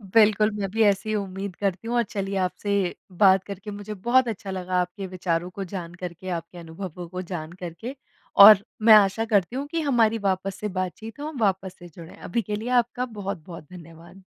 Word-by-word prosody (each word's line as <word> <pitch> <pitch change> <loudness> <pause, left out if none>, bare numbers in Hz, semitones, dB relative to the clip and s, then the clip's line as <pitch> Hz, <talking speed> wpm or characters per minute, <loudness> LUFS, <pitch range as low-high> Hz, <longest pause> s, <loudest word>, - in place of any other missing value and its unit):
बिल्कुल 215 -1 +5
मैं 195 - -2
भी 225 +1 +2
ऐसे 200 +1 +2
ही 215 - 0
उम्मीद 195 -1 -4
करती 195 +2 -2
हूँ 240 - -1
और 235 - +3
चलिए 195 -1 -3
आपसे 200 +2 -2 0.5
बात 190 -1 +6
करके 200 +1 -8
मुझे 205 +1 -7
बहुत 255 +1 +4
अच्छा 200 -3 -5
लगा, 185 -1 -3
आपके 185 +2 -5
विचारों 180 -1 -2
को 195 +2 -6
जान 170 -2 -5
करके, 180 +1 -6
आपके 170 0 -5
अनुभवों 175 +1 -8
को 185 - -2
जान 155 -1 -5
करके। 200 +10 -6 0.5
और 210 -2 +8 0.2
मैं 220 - +10
आशा 210 +1 +5
करती 205 -1 +1
हूँ 275 +2 -2
कि 330 - -1
हमारी 235 -6 +2
वापस 190 0 0
से 210 - -2
बातचीत 220 +6 -5
हो 295 - -4
हम 310 -4 -7
वापस 190 -2 0
से 175 - -11
जुड़ें। 165 0 -12
अभी 230 +7 -2
के 210 -1 -4
लिए 220 +4 -5
आपका 245 +2 -5
बहुत-बहुत 180 -4 -6
धन्यवाद। 170 +2 -13
195 Hz, 200 wpm, -25 LUFS, 180-215 Hz, 0.5 s, मैं